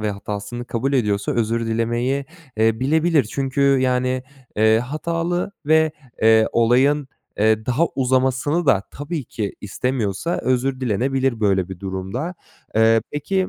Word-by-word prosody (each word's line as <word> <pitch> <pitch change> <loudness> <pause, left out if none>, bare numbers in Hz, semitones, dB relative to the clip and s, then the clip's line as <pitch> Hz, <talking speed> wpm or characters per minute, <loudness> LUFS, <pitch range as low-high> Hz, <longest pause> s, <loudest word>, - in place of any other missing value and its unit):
ve 105 -1 -1
hatasını 105 +4 -5
kabul 125 +3 -2
ediyorsa 105 -6 +1
özür 115 0 0
dilemeyi, 120 +4 -1 0.3
eee, 110 +1 +2
bilebilir. 160 0 +2
Çünkü, 135 0 -2 0.2
yani, 130 0 0 0.3
eee, 110 +1 +4
hatalı 165 - -2
ve, 160 0 +4 0.3
eee, 110 0 +6
olayın, 130 +5 +3 0.3
eee, 110 +1 +2
daha 140 +7 +2
uzamasını 130 +5 +1
da 110 -8 +4
tabii 145 0 -5
ki 105 -3 -4
istemiyorsa 120 - -2
özür 130 +1 0
dilenebilir 130 +1 0
böyle 95 -3 +2
bir 95 -1 -8
durumda. 95 - -4 0.4
Eee, 110 0 +5
peki 185 +6 -1
125 Hz, 130 wpm, -21 LUFS, 110-140 Hz, 0.4 s, eee